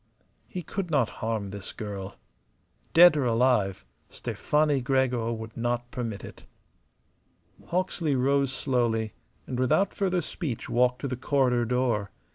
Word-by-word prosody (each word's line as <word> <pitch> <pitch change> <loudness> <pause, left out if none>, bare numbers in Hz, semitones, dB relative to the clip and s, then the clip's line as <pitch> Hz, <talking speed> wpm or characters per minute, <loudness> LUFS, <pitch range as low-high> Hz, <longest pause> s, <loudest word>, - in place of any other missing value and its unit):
He 180 -4 -6
could 195 0 -4
not 140 -8 +2
harm 110 -3 -2
this 100 0 -5
girl. 100 -2 -6 0.8
Dead 175 -1 +9
or 145 -3 +1
alive, 115 - +2 0.2
Stefani 150 -2 0
Gregor 125 -3 +1
would 110 -1 -6
not 120 +1 -2
permit 115 -6 -4
it. - - -11 1.2
Hawksley 175 -4 0
rose 135 +1 +2
slowly 120 -5 0 0.3
and 125 - -4
without 130 +10 +2
further 185 -3 0
speech 150 - -4
walked 125 +1 +2
to 140 - -2
the 130 - -2
corridor 125 -2 +1
door. 120 -4 0
125 Hz, 130 wpm, -27 LUFS, 115-140 Hz, 1.2 s, Dead